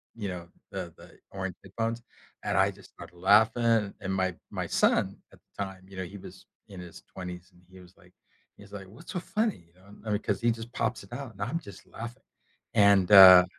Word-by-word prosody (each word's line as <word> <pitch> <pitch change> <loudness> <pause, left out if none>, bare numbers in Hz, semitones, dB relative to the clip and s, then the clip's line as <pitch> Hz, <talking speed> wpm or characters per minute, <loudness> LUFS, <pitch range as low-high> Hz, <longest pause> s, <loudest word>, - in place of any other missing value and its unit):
you 105 -3 -4
know, 90 -2 -6 0.2
the - - -6
the - - -15 0.2
orange 95 -2 -4
headphones, 115 +4 -3 0.4
and - - 0
I - - +4
just - - -16
started 90 - -13
laughing, 110 +2 +4
and 95 -1 -2
my 95 -2 0 0.2
my - - -3
son, - - +2
at - - -19
the 100 - -6
time, 95 -1 -9
you 95 0 -13
know, 95 - -2
he 100 +3 -9
was - - -12 0.2
in 95 -3 -10
his 90 -2 -11
20s, 90 0 -8
and 90 - -22
he 95 - -14
was 90 0 -17
like 90 +1 -22 0.4
he's 100 0 -15
like, 95 -2 -8
"What's 115 - -11
so 180 - -1
funny?" 215 - -2
You 85 - -31
know? 95 +2 -22 0.2
I - - -2
mean, 105 - +1
'cause 100 -2 -2
he 120 0 +3
just 115 +1 -7
pops 110 -1 -2
it 100 - -13
out, 135 -4 -6
and 95 - -13
I'm 125 +10 -1
just 140 -11 -13
laughing, 120 +3 -9 0.5
and, 100 -4 +5
uh, 95 -2 +11
100 Hz, 220 wpm, -28 LUFS, 95-115 Hz, 0.5 s, uh